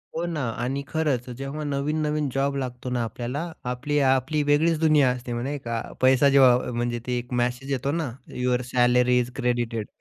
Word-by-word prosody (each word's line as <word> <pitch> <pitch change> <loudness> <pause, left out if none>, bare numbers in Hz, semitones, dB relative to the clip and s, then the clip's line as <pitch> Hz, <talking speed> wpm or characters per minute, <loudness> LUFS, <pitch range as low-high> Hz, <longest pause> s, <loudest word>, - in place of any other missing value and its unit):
हो 170 +1 -1
ना, 165 -4 -3 0.2
आणि 135 +3 -2
खरंच 145 -6 -1
जेव्हा 140 +3 -5
नवीन-नवीन 150 +1 -1
जॉब 140 +1 0
लागतो 125 -1 -4
ना, 125 -1 -1
आपल्याला, 125 +9 -4 0.2
आपली-आपली 135 +2 +1
वेगळीच 160 +2 +3
दुनिया 155 -5 +4
असते 125 -1 -5
मग, 120 - -2
नाही 145 +2 -3
का? 115 -1 -2 0.2
पैसा 130 +2 +5
जेव्हा 125 -3 +5
म्हणजे 120 0 -2
ते 125 0 0
एक 120 +1 -8
मेसेज 125 +3 -2
येतो 135 +1 -1
ना, 160 -6 -2 0.2
यूअर 125 0 0
सॅलरी 125 0 +4
इज 125 0 -2
क्रेडिटेड 120 -3 -1
130 Hz, 175 wpm, -25 LUFS, 125-145 Hz, 0.2 s, पैसा